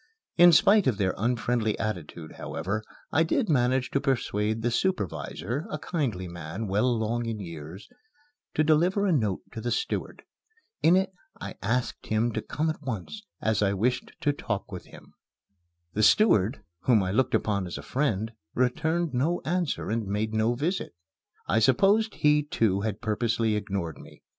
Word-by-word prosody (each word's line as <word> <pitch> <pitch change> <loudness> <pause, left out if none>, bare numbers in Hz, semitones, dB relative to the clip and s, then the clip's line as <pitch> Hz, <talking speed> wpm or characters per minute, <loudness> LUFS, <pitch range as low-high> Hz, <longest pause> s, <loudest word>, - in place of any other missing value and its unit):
In 175 0 +8
spite 200 +4 +5
of 120 -6 +2
their 95 -2 +1
unfriendly 115 0 0
attitude, 85 -6 -5
however, 95 +7 -3 0.3
I 160 - +3
did 180 +7 +1
manage 130 -2 +2
to 140 - +1
persuade 110 -5 0
the 120 - +1
supervisor, 140 - -2
a - - -3
kindly 130 - -2
man, 85 +5 -6
well 105 +5 +1
along 120 0 0
in 115 -2 -3
years, 85 0 -8 0.7
to 155 - +3
deliver 175 +6 +3
a 195 - +2
note 110 - +1
to 115 - -6
the - - -2
steward. 450 - -2 0.6
In 170 +3 +5
it 190 0 +2 0.3
I - - -6
asked 120 +4 -1
him 110 +2 +1
to 110 - -2
come 155 +8 -2
at 155 - -9
once, 130 - -5 0.2
as 110 -1 +1
I 100 -1 +2
wished 125 +6 -1
to 145 - +2
talk 105 -8 -4
with 90 -2 -7
him. - - -15 0.8
The 110 - 0
steward, 110 - +4 0.2
whom 115 -6 +4
I 90 - -1
looked 130 +5 +2
upon 100 -4 0
as 85 - -5
a - - -8
friend, 110 -6 -1 0.2
returned 160 +6 0
no 150 +8 +1
answer 170 - -1
and 110 -2 -1
made 105 +2 -1
no 110 +2 +2
visit. 155 - -2 0.5
I 110 - +2
supposed 195 - +3
he, 150 0 +4
too, 110 -9 0
had 105 -1 -3
purposely 110 0 0
ignored 100 -6 -3
me. - - -15
115 Hz, 165 wpm, -27 LUFS, 105-150 Hz, 0.8 s, In